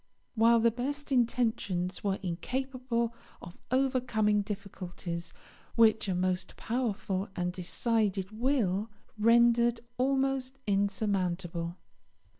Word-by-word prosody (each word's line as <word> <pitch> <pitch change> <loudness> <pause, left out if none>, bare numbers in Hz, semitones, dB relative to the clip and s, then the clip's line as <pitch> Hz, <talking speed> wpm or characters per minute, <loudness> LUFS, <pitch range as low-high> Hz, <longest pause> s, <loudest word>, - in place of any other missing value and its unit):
while 230 0 +5
the 230 +1 +4
best 280 +5 -4
intentions 225 -7 0
were 200 -1 +1
incapable 240 +5 -2 0.3
of 175 - -11
overcoming 245 -5 +2
difficulties 185 -4 -6 0.4
which 220 -2 +4
a 185 - 0
most 185 0 -1
powerful 210 -5 -2
and 180 0 -1
decided 195 +1 0
will 220 -4 0 0.3
rendered 235 +1 +4 0.2
almost 270 0 +1
insurmountable. 190 -4 -1
220 Hz, 90 wpm, -30 LUFS, 190-245 Hz, 0.4 s, while